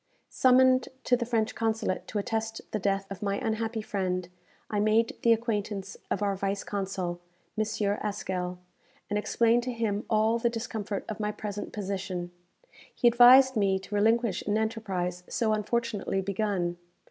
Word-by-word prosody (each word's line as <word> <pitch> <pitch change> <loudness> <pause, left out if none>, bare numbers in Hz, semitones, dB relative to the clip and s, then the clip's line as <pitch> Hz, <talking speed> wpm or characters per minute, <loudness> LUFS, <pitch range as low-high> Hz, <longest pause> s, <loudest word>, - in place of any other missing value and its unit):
Summoned 255 0 +4
to 250 - +3
the 240 -1 -3
French 225 -1 0
Consulate 220 -4 -1
to - - -4
attest 225 +1 -2
the 215 - -1
death 195 0 0
of 195 - -6
my 200 -1 0
unhappy 220 0 -2
friend, 185 -3 -2 0.4
I 210 - -1
made 215 +2 +2
the 235 - +4
acquaintance 210 -4 -1
of - - -1
our 200 -1 +1
vice 195 +1 -2
consul, 190 -3 -3 0.4
M. 215 - +1 0.4
Haskell, 185 -3 -3 0.5
and 210 - +1
explained 230 +2 +2
to 250 +1 -3
him 220 -3 -1
all 220 +1 +3
the 235 - +2
discomfort 220 -3 -4
of 215 - -5
my 210 0 -1
present 210 -1 -5
position. 190 -3 -4 0.6
He 245 - +3
advised 250 +2 +8
me 195 -3 +2
to 190 +2 -10
relinquish 220 0 +2
an 210 0 +2
enterprise 195 -5 -2
so 220 -2 +1
unfortunately 215 -2 -1
begun. 190 -3 -1
215 Hz, 155 wpm, -28 LUFS, 195-230 Hz, 0.6 s, advised